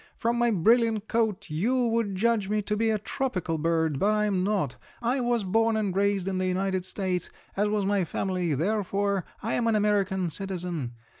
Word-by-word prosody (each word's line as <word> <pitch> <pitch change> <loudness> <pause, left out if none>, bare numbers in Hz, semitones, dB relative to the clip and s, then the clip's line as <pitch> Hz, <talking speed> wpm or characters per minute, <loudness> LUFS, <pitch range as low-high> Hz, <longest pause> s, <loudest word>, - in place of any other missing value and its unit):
From 235 +1 0
my 240 0 +3
brilliant 220 +2 +3
coat 220 -4 0
you 240 +11 +1
would 225 -4 0
judge 215 0 +1
me 210 0 0
to 210 - -1
be 225 +1 +1
a 220 - +2
tropical 200 - -2
bird, 160 -3 +1
but 210 +2 +3
I'm 205 -3 +1
not. 190 -10 0 0.2
I 245 +3 0
was 240 -3 +1
born 225 +3 +2
and 200 -4 -1
raised 200 -1 +1
in 190 -1 -1
the 185 - 0
United 185 0 -1
States, 185 -2 -2 0.3
as 205 +2 +2
was 210 -2 0
my 200 -1 +2
family, 180 -2 -1
therefore 200 +2 0 0.2
I 225 - -1
am 235 - +1
an 225 - +3
American 200 -4 +1
citizen. 175 -9 -4
200 Hz, 190 wpm, -27 LUFS, 185-220 Hz, 0.3 s, my